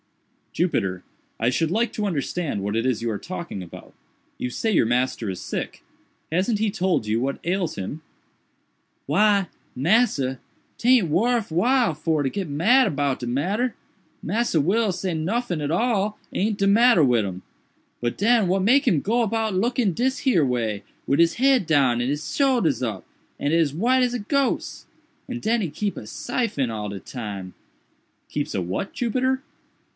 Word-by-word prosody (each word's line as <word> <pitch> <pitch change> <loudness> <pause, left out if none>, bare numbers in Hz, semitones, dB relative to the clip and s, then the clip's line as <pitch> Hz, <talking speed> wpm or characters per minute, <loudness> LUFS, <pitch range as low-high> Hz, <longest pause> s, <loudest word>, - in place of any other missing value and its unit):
"Jupiter, 95 - -1 0.4
I 115 - +2
should 160 +5 0
like 230 +5 0
to 210 -1 -1
understand 155 - -2
what 105 +2 -2
it 115 +2 0
is 125 -4 0
you 120 - 0
are 105 - -3
talking 170 - -6
about. 85 - -12 0.5
You 125 - -2
say 225 - -2
your 175 - +3
master 120 -2 0
is 95 - -4
sick. - - -5 0.5
Hasn't 190 +6 +1
he 220 0 +1
told 185 - 0
you 110 +2 0
what 135 +2 -2
ails 180 -1 -1
him?" 120 +12 -5 1.0
"Why, 205 -3 +3 0.3
massa, 140 - +2 0.4
'taint 245 -6 +4
worf 220 +6 +1
while 235 +4 +2
for 155 0 0
to 135 - 0
git 190 +1 -4
mad 225 - +4
about 140 -2 -1
de 120 - -5
matter—Massa 190 - -2
Will 200 +8 +2
say 185 0 -3
noffin 175 +2 -1
at 145 0 -2
all 210 +1 +1 0.2
aint 210 +1 0
de 195 - +1
matter 230 -3 +5
wid 120 -5 +3
him—but 100 +5 -8
den 225 -1 +3
what 190 +1 +1
make 270 +8 +4
him 175 -11 +4
go 235 +4 +1
about 225 -1 0
looking 225 +1 +1
dis 260 +7 0
here 245 - +3
way, 115 -5 -1 0.2
wid 140 - +2
he 170 - +7 0.2
head 270 -6 +4
down 135 -6 +3
and 120 - -1
he 145 - +1
soldiers 235 - +1
up, 110 -6 -3 0.3
and 145 +2 0
as 165 -4 +2
white 245 - +2
as 245 0 0
a - - -2
gose? 275 +6 -1 0.4
And 245 -1 -4
den 225 +2 +1
he 180 - -2
keep 200 +7 -3
a 105 - -8
syphon 185 - -2
all 105 -2 -4
de 100 -1 -6
time—" 100 -6 -7 0.8
"Keeps - - -3
a - - 0
what, 95 - -3
Jupiter?" 260 +3 0
180 Hz, 170 wpm, -24 LUFS, -, 1.0 s, he